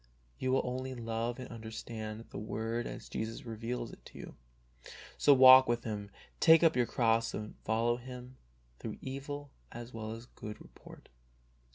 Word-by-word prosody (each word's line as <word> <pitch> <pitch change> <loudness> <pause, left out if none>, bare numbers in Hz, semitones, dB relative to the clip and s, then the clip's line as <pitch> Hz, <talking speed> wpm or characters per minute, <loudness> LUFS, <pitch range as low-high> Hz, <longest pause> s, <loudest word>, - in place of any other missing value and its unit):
You 130 - 0
will 135 - +3
only 130 +1 -3
love 115 0 -2
and 130 - -7
understand 110 -1 -6
the - - -5
Word 115 +2 -3
as - - -8
Jesus 110 +2 -4
reveals' 115 +1 -4
it - - -14
to - - -12
you. - - -9 0.8
So 145 - +5
walk 130 -1 +10
with 120 0 0
Him, 105 -3 -4 0.3
take 165 0 +7
up 165 -1 +5
your 125 -2 +2
cross 115 -1 +2
and 105 0 -5
follow 115 +2 +2
Him 125 +1 -10 0.4
through - - -6
evil 140 +1 -6 0.2
as 120 +1 -8
well 110 -1 -5
as 115 +1 -9
good 105 -3 -9
report. - - -14
120 Hz, 165 wpm, -33 LUFS, 115-130 Hz, 0.8 s, walk